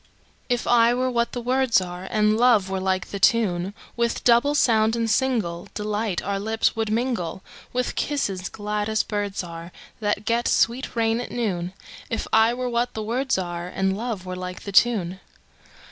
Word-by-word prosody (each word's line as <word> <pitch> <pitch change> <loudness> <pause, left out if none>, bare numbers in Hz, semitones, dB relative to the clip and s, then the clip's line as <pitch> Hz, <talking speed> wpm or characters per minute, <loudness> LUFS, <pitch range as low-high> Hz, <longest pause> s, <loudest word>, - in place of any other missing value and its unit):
If 245 -1 0
I 235 0 +4
were 255 +1 0
what 235 -1 0
the 245 - -3
words 255 -2 +3
are, 180 0 -6
And 215 0 +2
love 225 -5 +4
were 190 - -1
like 185 -1 -1
the 200 - -4
tune, 195 -3 +2 0.2
With 235 0 -1
double 250 +5 +4
sound 225 -4 +3
and 230 -1 0
singleDelight 210 -3 -1
our 200 0 -1
lips 220 +2 0
would 225 -1 -1
mingle, 225 -7 -1 0.3
With 250 0 -1
kisses 195 -11 -1
glad 210 0 -3
as 220 0 +1
birds 205 -2 -3
areThat 180 +5 -5
get 235 +1 +1
sweet 240 +3 +1
rain 225 0 +1
at - - -6
noon; 185 -7 -2 0.4
If 225 - -2
I 220 +1 +5
were 250 +1 -3
what 240 0 -1
the 220 - -3
words 255 +5 0
areAnd 180 +1 -2
love 215 -3 -4
were 185 0 -5
like 180 0 -6
the 200 - -5
tune. 195 -4 +3
220 Hz, 170 wpm, -24 LUFS, 190-235 Hz, 0.4 s, I